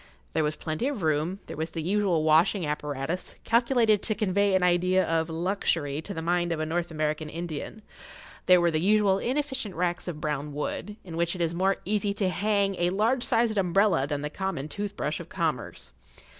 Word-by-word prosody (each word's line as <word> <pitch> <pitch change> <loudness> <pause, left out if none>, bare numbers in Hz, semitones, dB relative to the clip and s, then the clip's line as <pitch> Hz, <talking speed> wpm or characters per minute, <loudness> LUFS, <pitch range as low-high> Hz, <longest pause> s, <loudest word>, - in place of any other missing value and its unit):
There 160 - +2
was 150 +1 0
plenty 160 +11 -2
of 270 -10 -3
room; 160 +5 0
there - - -7
was 160 +2 -3
the 160 0 -4
usual 185 -3 +1
washing 160 +4 +4
apparatus, 150 +3 -3
calculated 235 -3 +3
to 215 - 0
convey 200 -1 +2
an 185 - +2
idea 180 +1 +3
of 165 0 0
luxury 165 -4 -1
to 200 - -8
the 160 -4 -4
mind 175 0 +1
of 165 - -1
a 155 - -1
North 170 +2 -2
American 155 -1 -2
Indian; 170 +6 -6 0.6
there 180 -1 +7
were 175 -1 +3
the 155 -1 0
usual 200 0 +3
inefficient 265 -5 -2
racks 175 +1 -1
of 165 -4 -4
brown 150 -1 -3
wood, 205 +7 -4
in 165 -3 -7
which 170 +1 0
it 180 - -4
is 165 -1 0
more 190 +3 +1
easy 205 0 0
to 195 -2 +1
hang 200 0 +1
a 175 0 +3
large 220 +7 +1
sized 230 -4 +2
umbrella 185 -5 +3
than 145 -1 -3
the 150 - -3
common 190 -6 -3
tooth 205 +4 -5
brush 150 +1 -2
of 170 0 -9
commerce. 155 - -3
175 Hz, 200 wpm, -27 LUFS, 155-200 Hz, 0.6 s, there